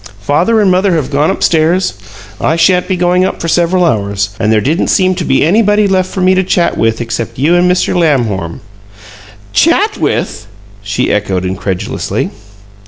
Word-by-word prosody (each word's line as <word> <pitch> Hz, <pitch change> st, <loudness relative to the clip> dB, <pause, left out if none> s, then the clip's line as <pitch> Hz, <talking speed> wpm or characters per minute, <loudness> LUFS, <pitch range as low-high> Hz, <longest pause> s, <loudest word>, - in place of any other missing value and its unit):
Father 175 Hz, -, +1 dB
and 200 Hz, -3 st, +3 dB
mother 185 Hz, +1 st, +2 dB
have 150 Hz, -4 st, -2 dB
gone 145 Hz, +2 st, +1 dB
up 190 Hz, -, -2 dB
stairs; 165 Hz, -, +1 dB, 0.5 s
I 160 Hz, -, +1 dB
sha'n't 180 Hz, +2 st, +2 dB
be 185 Hz, -, -1 dB
going 180 Hz, +1 st, +2 dB
up 190 Hz, -, -2 dB
for 165 Hz, -, -4 dB
several 175 Hz, +2 st, +1 dB
hours, 100 Hz, -, -1 dB
and 110 Hz, -1 st, +1 dB
there 110 Hz, -, +3 dB
didn't 155 Hz, -, 0 dB
seem 185 Hz, -1 st, +2 dB
to 180 Hz, -1 st, -4 dB
be 135 Hz, -2 st, +1 dB
anybody 210 Hz, +3 st, +2 dB
left 185 Hz, -1 st, 0 dB
for 190 Hz, -, -4 dB
me 185 Hz, +1 st, +4 dB
to 185 Hz, 0 st, +1 dB
chat 175 Hz, -1 st, 0 dB
with 115 Hz, +1 st, 0 dB
except 115 Hz, 0 st, -4 dB
you 150 Hz, +7 st, +2 dB
and 175 Hz, +1 st, +3 dB
Mr. 180 Hz, -, 0 dB
Lamhorn." 115 Hz, -, 0 dB, 0.9 s
"'CHAT 395 Hz, +6 st, +2 dB
with'!" 105 Hz, -, -2 dB, 0.3 s
she 100 Hz, 0 st, -2 dB
echoed, 95 Hz, -3 st, -1 dB
incredulously. 95 Hz, 0 st, -3 dB
165 Hz, 175 wpm, -12 LUFS, 115-185 Hz, 0.9 s, me